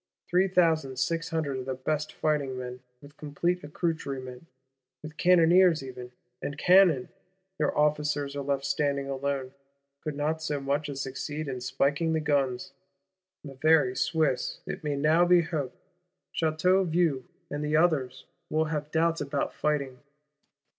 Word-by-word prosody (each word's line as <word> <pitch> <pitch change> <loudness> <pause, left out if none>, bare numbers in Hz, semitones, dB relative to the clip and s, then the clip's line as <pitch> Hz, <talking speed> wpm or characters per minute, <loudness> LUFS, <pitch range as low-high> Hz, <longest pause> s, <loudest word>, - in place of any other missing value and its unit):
Three 180 +2 +3
thousand 160 -7 +2
six 165 +6 -1
hundred 145 -5 -2
of 130 - -7
the 130 - -2
best 150 +4 -2
fighting 145 -4 -1
men, 125 0 -6 0.2
with 145 +1 -15
complete 170 +4 -2
accoutrement; 140 -4 -4 0.6
with 155 0 -9
cannoneers 175 -1 +5
even, 125 -2 -8 0.3
and 140 - -4
cannon! 180 -7 +5 0.5
Their 150 - 0
officers 150 -1 +1
are 140 - -2
left 140 0 -1
standing 140 0 0
alone; 135 -1 -2 0.5
could 155 -3 -4
not 155 +2 -1
so 150 -2 -2
much 140 +2 -1
as 135 -1 -4
succeed 145 +3 -4
in 130 -2 -4
"spiking 140 +5 0
the 160 - +1
guns." 140 -5 -1 0.7
The 140 -3 -8
very 150 -2 +3
Swiss, 155 -5 0
it - - -6
may 150 -1 -1
now 155 +4 +3
be 175 0 +5
hoped, 150 -6 -4 0.6
Château 170 +4 +2
Vieux 160 -5 +1 0.3
and 145 +1 -3
the 150 +1 0
others, 155 -7 +1 0.2
will 155 +1 +1
have 150 -1 -3
doubts 165 +1 +1
about 140 -1 -2
fighting. 140 -4 -1
150 Hz, 145 wpm, -28 LUFS, 135-160 Hz, 0.7 s, cannoneers